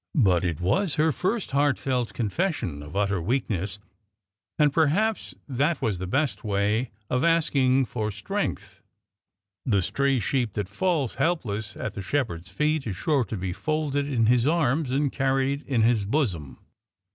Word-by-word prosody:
But 95 - +3
it 85 -4 -1
was 160 - +1
her 160 +1 +3
first 185 - -1
heartfelt 135 -3 0
confession 120 - -1
of 75 +5 -10
utter 100 -2 +1
weakness, 100 -3 -1 0.8
and 150 -3 +3
perhaps 190 +9 +1
that 145 +5 0
was 110 -8 -1
the 95 - -4
best 135 +8 0
way 105 +3 0 0.2
of 125 +4 0
asking 140 -6 +3
for 110 -2 -3
strength. 105 - -4 0.8
The 100 -7 +2
stray 140 +6 +1
sheep 120 -2 0
that 105 -3 -2
falls 145 - -1
helpless 110 -11 -1
at 110 - -4
the 100 - -5
Shepherd's 95 - -2
feet 150 - 0
is 100 - -3
sure 140 - +1
to 110 - -5
be 90 -1 -3
folded 145 - -1
in 120 -5 +1
His 120 +2 +3
arms 155 -3 +1
and 140 +1 +1
carried 135 +1 0
in 125 -5 +2
His 115 -2 +3
bosom. 100 - -1
130 Hz, 155 wpm, -26 LUFS, 105-145 Hz, 0.8 s, But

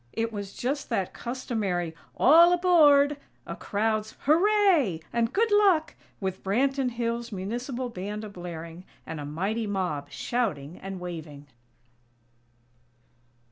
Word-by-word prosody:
It 225 0 -2
was 200 -2 -6
just 275 +3 -3
that 190 - -1
customary 215 -9 -3 0.2
"All 335 +6 +7
aboard!!" 295 -5 +5 0.3
a - - -6
crowd's 215 +1 -1
"Hooray!!" 335 - +3
and 230 -1 +1
"Good 445 +2 +1
Luck!!", 390 -6 +4 0.3
with 190 -1 -4
Branton 265 +6 +1
Hills' 235 0 -3
Municipal 240 +6 -4
Band 210 0 -5
a 215 - -6
blaring, 175 -2 -8 0.2
and 160 - -6
a 145 - -5
mighty 195 +9 -2
mob 180 -8 -2
shouting 180 - -3
and 195 -1 -6
waving. 160 -5 -7
225 Hz, 120 wpm, -27 LUFS, 185-275 Hz, 0.3 s, All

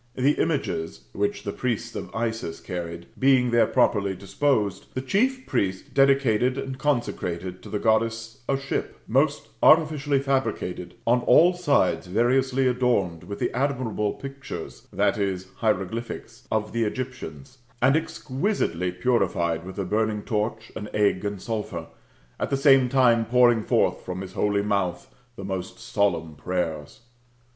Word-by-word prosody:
The 135 +3 +3
images 140 - -2
[which 100 0 -1
the 100 - -3
priests 120 -2 -3
of - - -5
Isis 110 -7 -3
carried] 85 -1 -6
being 130 -2 +4
there 115 -2 +4
properly 100 -6 +2
disposed, 100 0 0
the 130 - -1
chief 255 - +1
priest 95 -1 -2
dedicated 135 -3 +3
and 135 -1 -5
consecrated 95 - -2
to - - -11
the 105 - -1
Goddess 115 +1 0
a 135 - +2
ship,^' 135 0 -3
most 140 +5 +1
artificially 150 -3 +4
fabricated, 110 -10 -2
on 120 +2 +4
all 170 +8 +6
sides 140 - +1
variously 130 +6 +2
adorned 120 -10 +1
with 100 +3 -6
the - - -1
admirable 125 -6 0
pictures 135 -11 -8
[/>. 95 -3 0
hieroglyphics] 115 +4 -3
of 110 -1 0
the 115 -1 +1
Egyptians, 130 +3 -5 0.2
and 130 +4 +4
exquisitely 140 - -1
purified 90 -5 0
with 95 +2 -9
a 100 - -2
burning 105 +1 0
torch, 110 +1 -2
an 105 - -6
egg, 100 -3 +2
and 100 -1 -3
sulphur, 105 -7 -4 0.5
at - - -1
the 135 - +1
same 135 -2 +5
time 120 -3 +4
pouring 120 -1 +4
forth - - +1
from 90 0 -5
his 95 -1 -8
holy 100 -1 +1
mouth 100 -4 -1 0.2
the 95 - -7
most 95 0 -4
solemn 100 -8 0
prayers. 80 0 -3
115 Hz, 140 wpm, -25 LUFS, 95-130 Hz, 0.5 s, all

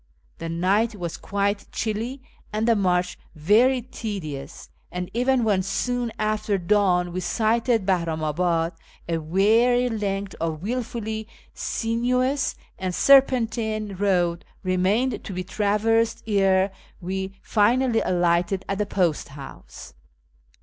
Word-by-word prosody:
The 165 - -4
night 200 +7 +1
was 175 -4 -4
quite 200 0 -2
chilly 230 +5 -3 0.3
and 215 +1 -1
the 230 - +5
march 180 -3 0 0.2
very 230 - +3
tedious, 180 - -6 0.2
and 180 0 -5
even 250 +1 +2
when 205 -4 +2
soon 240 +5 -1
after 215 -1 0
dawn 180 -2 +2
we 185 - -2
sighted 225 +3 +1
Bahramabad, 165 -1 0 0.4
a 165 -1 0
weary 225 +9 +3
length 200 -3 -2
of 160 -1 -2
wilfully 220 -1 -3 0.3
sinuous 250 +4 0 0.2
and 185 -1 -2
serpentine 230 -6 +3
road 180 -3 +1 0.2
remained 190 +8 +1
to 195 - -6
be 185 0 -3
traversed 220 +4 +1
ere 195 -2 +3 0.3
we 190 +2 -4
finally 235 +2 +2
alighted 175 +1 +1
at 195 0 -2
the 210 - 0
post 175 -6 0
house. 140 -1 -11
200 Hz, 115 wpm, -24 LUFS, 180-230 Hz, 0.4 s, the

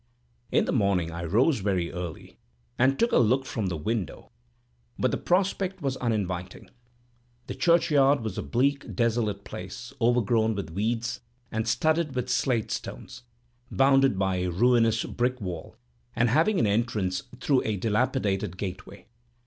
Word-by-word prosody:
In - - +3
the - - -1
morning 90 -5 +1
I 85 +1 -5
rose 115 - +2
very 95 -4 -1
early, 90 -2 -7 0.4
and 135 +1 +3
took 235 - +2
a - - +4
look 125 +3 +2
from 110 -7 -3
the 90 -3 -2
window, 105 +2 -4 0.7
but - - +1
the - - 0
prospect 190 +1 0
was 135 -1 0
very 125 - -4
uninviting. 90 -3 -4 0.7
The - - -5
churchyard 145 -5 +3
was 110 -4 -4
a - - -3
bleak, 140 +3 0
desolate 115 -4 0
place, - - -8
overgrown 115 -2 +2
with 95 -6 -5
weeds, 115 +6 -2 0.3
and 110 +1 -2
studded 160 +3 +1
with 125 0 -2
slate 125 -3 0
stones, 130 - -6 0.5
bounded 135 -3 +3
by 95 -1 0
a 90 0 -1
ruinous 115 +3 +3
brick 125 +1 -1
wall, 90 -6 -6 0.4
and 115 +1 +2
having 160 - +3
an - - +3
entrance 100 -3 0 0.2
through 135 0 +2
a 105 -2 -1
dilapidated 105 -3 0
gateway. 95 +1 -7
115 Hz, 150 wpm, -27 LUFS, 95-130 Hz, 0.7 s, a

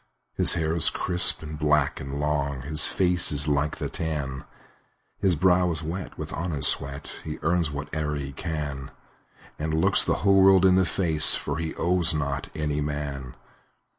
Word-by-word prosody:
His - - +3
hair 80 0 -1
is 85 - +5
crisp, 90 -2 +4
and 75 -1 -8
black, 75 -2 +1
and 70 +1 -6
long, 70 -2 -2
His 75 +2 0
face 90 -2 +1
is 75 0 +1
like 75 0 0
the - - -3
tan; 70 -5 -4 0.7
His 95 -3 +2
brow 90 +2 +3
is 80 0 -4
wet 85 +2 -6
with - - -6
honest 80 -5 +1
sweat, 70 +1 -6
He 75 - -6
earns 85 +1 +1
whate'er 75 +1 -4
he 70 -1 -5
can, 75 -3 -5 0.7
And 80 +1 -2
looks - - +3
the - - 0
whole 100 -1 +5
world 95 -1 +5
in 95 - +5
the 95 0 +3
face, 80 -5 +2
For - - -4
he 80 -1 -4
owes 85 -1 +1
not 70 -2 -3
any 75 -1 -2
man. 70 -3 -5
75 Hz, 170 wpm, -25 LUFS, 70-85 Hz, 0.7 s, is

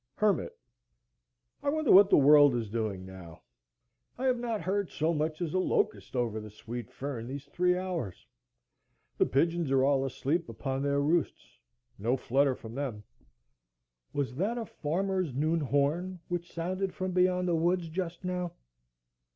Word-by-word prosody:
Hermit. 210 -4 +1 1.1
I 285 - 0
wonder 310 -1 +1
what 195 +1 +8
the - - +6
world 145 -1 +7
is 115 -4 -3
doing 105 -5 -2
now. 95 -4 -11 0.7
I 260 - -3
have 255 -2 +2
not 230 -3 -2
heard 195 +2 -1
so 160 +2 0
much 155 +2 -1
as 160 - -3
a 185 - +2
locust 100 - 0
over 115 -3 0
the 105 0 -8
sweet 115 +2 -7
fern 130 -4 -5
these 140 +2 -6
three 180 +5 +1
hours. 175 - -4 0.9
The - - +4
pigeons 165 +2 +1
are 135 -1 +3
all 135 -1 +3
asleep 140 +4 -1
upon 135 +4 -3
their 140 0 +1
roosts,—no 125 - -2
flutter 135 +1 +2
from 110 -2 -10
them. 125 -6 -4 1.1
Was 140 -3 -2
that 210 +8 0
a 230 - -3
farmer's 185 - -2
noon 155 +4 +1
horn 155 +6 0
which 175 -1 -3
sounded 185 +3 -3
from 185 0 -2
beyond 180 0 +2
the 175 - +1
woods 170 +1 +1
just 170 +1 -4
now? 180 -1 -2
155 Hz, 155 wpm, -30 LUFS, 130-180 Hz, 1.1 s, what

